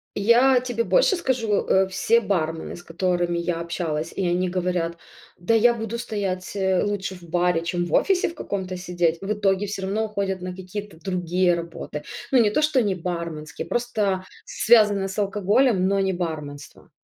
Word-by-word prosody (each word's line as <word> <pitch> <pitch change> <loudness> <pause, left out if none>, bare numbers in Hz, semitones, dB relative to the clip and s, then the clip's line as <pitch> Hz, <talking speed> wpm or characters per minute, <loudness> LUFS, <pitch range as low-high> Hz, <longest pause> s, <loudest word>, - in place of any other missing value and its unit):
Я 245 +5 +5
тебе 245 -2 -2
больше - - +3
скажу, 235 - 0
э, 190 0 +4
все 230 +5 +2
бармены, 165 -5 -2
с 175 - -12
которыми 175 0 -1
я 170 -1 -2
общалась, 165 -2 -3
и 190 -2 -1
они 180 +1 +1
говорят: 175 -2 -1 0.4
"Да 225 +6 +2
я 235 +2 +5
буду 225 0 -4
стоять, 200 -5 -3
э, 190 -2 +1
лучше 200 -2 -2
в 180 - -14
баре, 175 0 +1
чем 175 +1 -1
в - - -6
офисе 380 -3 +2
в 335 - -11
каком-то 185 -2 -4
сидеть". 175 -2 0
В 205 +2 -1
итоге 200 -1 +1
всё 195 -1 -5
равно 210 +3 -1
уходят 200 -3 -2
на 180 0 -5
какие-то 190 -1 -7
другие 180 -1 +1
работы. 165 -3 -6 0.3
Ну 260 - +5
не 210 -3 +4
то, 300 - +1
что 290 -5 +3
не 200 -2 +1
барменские, 170 -3 -5
просто 210 -6 -1 0.2
связанные 210 -4 +4
с 190 - -7
алкоголем, 205 +1 +2
но 195 0 +1
не 190 -1 +1
барменство. 155 -5 -6
190 Hz, 175 wpm, -24 LUFS, 175-210 Hz, 0.4 s, Я